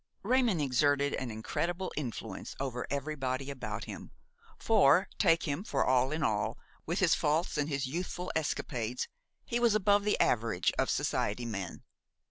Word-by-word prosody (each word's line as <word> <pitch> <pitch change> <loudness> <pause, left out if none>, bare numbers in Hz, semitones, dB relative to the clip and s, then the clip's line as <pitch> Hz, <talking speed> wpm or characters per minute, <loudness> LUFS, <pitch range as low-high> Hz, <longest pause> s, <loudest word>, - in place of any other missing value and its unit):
Raymon 240 -4 +3
exerted 145 +1 +2
an 130 - -2
incredible 170 - -2
influence 130 -7 -5
over 130 -2 -3
everybody 140 -1 -2
about 140 - -5
him; - - -8 0.5
for, 190 -4 +4
take 165 -4 +4
him 150 +4 -2
for 140 -10 0
all 130 +1 +3
in 155 +1 -1
all, 105 -5 0 0.3
with - - -1
his - - +4
faults 155 +4 +1
and 150 0 0
his 140 -2 -1
youthful 175 +5 -4
escapades, 125 -6 -2 0.4
he 240 - -1
was 235 -3 +4
above 205 0 +4
the 210 - +1
average 110 -6 +2
of - - +2
society 105 +4 0
men. 100 -6 -5
145 Hz, 150 wpm, -31 LUFS, 125-175 Hz, 0.5 s, for